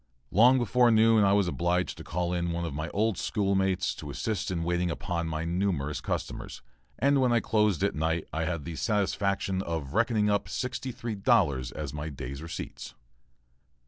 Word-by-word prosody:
Long 120 +6 +6
before 125 0 +3
noon 110 -1 +5
I 100 0 +4
was 100 -2 +3
obliged 85 +1 0
to - - -7
call 90 +1 -2
in 85 -1 -1
one 85 0 -2
of 80 - -4
my 75 +3 -3
old 105 -2 0
schoolmates 95 -2 0
to 75 - -8
assist 105 +7 -2
in 85 -3 -2
waiting 90 +1 0
upon 85 0 -3
my 80 0 -3
numerous 85 -5 -1
customers - - -4 0.3
and 140 0 +3
when 125 -2 +3
I 120 - +4
closed 105 -4 +1
at 100 - +2
night 80 +2 -1
I 80 +1 -1
had 80 -3 -3
the 85 - -5
satisfaction 100 -2 0
of 80 -7 -4
reckoning 110 -1 +2
up 100 -1 0
sixty 130 +1 -3
three 115 -1 -5
dollars 95 - +2
as - - -5
my 75 +1 -4
day's 70 0 -7
receipts. 80 0 -7
90 Hz, 180 wpm, -28 LUFS, 80-105 Hz, 0.3 s, Long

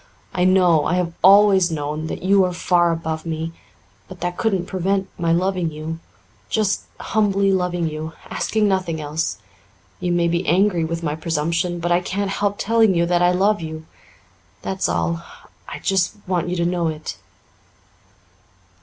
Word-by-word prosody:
I 180 0 +1
know 180 -4 +4
I 180 - +1
have 175 -2 -1
always 195 -2 +6
known 155 0 -3
that - - -6
you 195 +1 +4
are 180 -1 0
far 175 -1 +2
above 160 -1 -3
me. 165 0 -3 0.6
But 185 -2 -11
that 175 0 -2
couldn't 195 -5 0
prevent 190 +1 -1
my 170 -1 0
loving 180 0 +1
you 155 +2 -6 0.5
just 210 -3 0
humbly 200 -2 +1
loving 180 -2 0
you, 155 +1 -5
asking 215 -1 0
nothing 185 -5 0
else. 150 - -2 0.6
You 180 - -1
may 175 -1 +2
be 170 +1 -1
angry 180 +1 +3
with 165 +1 -3
my 150 -2 -1
presumption, 165 +2 -1
but 175 +1 -1
I 175 - +4
can't 195 +2 -2
help 205 0 0
telling 225 -3 +3
you 170 0 +2
that 175 0 +1
I 175 - +5
love 195 +2 +2
you. 160 0 -6 0.8
That's 190 0 -1
all. 170 0 -1 0.5
I - - -6
just 190 -3 0
want 180 -2 -1
you 180 - -1
to 170 -1 0
know 175 -1 0
it." 155 -1 -5
175 Hz, 165 wpm, -21 LUFS, 165-190 Hz, 0.8 s, always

